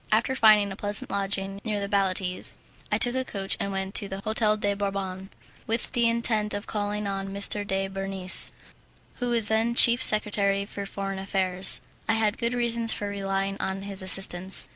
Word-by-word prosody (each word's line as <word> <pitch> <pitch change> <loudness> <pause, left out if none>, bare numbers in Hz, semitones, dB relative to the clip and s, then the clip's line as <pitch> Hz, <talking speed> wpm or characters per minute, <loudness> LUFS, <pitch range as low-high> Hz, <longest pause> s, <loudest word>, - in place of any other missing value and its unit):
After 230 +5 +1
finding 215 -4 +4
a - - -7
pleasant 205 0 -4
lodging 195 0 -4
near 215 -3 -3
the 200 - -4
Baletti's, 190 -2 +2 0.3
I - - +2
took 245 - +2
a 260 0 -2
coach 195 -5 -4
and 200 - -3
went 195 0 -5
to 200 - +1
the 195 0 -7
"Hotel 215 0 0
de 205 -1 -1
Bourbon" 195 -1 -5 0.4
with 225 +1 -3
the 235 -2 +1
intention 220 -3 0
of 205 - -9
calling 210 0 -4
on 195 -1 -4
M. 205 0 +5
de 195 0 -2
Bernis, 195 -1 +1 0.7
who 245 - -3
was 230 -3 +1
then 225 +2 0
chief 240 +1 +7
secretary 205 -3 +4
for 200 -1 -8
foreign 195 -1 -6
affairs. 190 -1 0 0.3
I - - +3
had 215 -1 -1
good 235 +1 -2
reasons 235 -1 +2
for 205 - -4
relying 195 0 -3
on 190 0 -4
his 200 -1 -3
assistance. 190 0 +1
200 Hz, 185 wpm, -25 LUFS, 195-220 Hz, 0.7 s, chief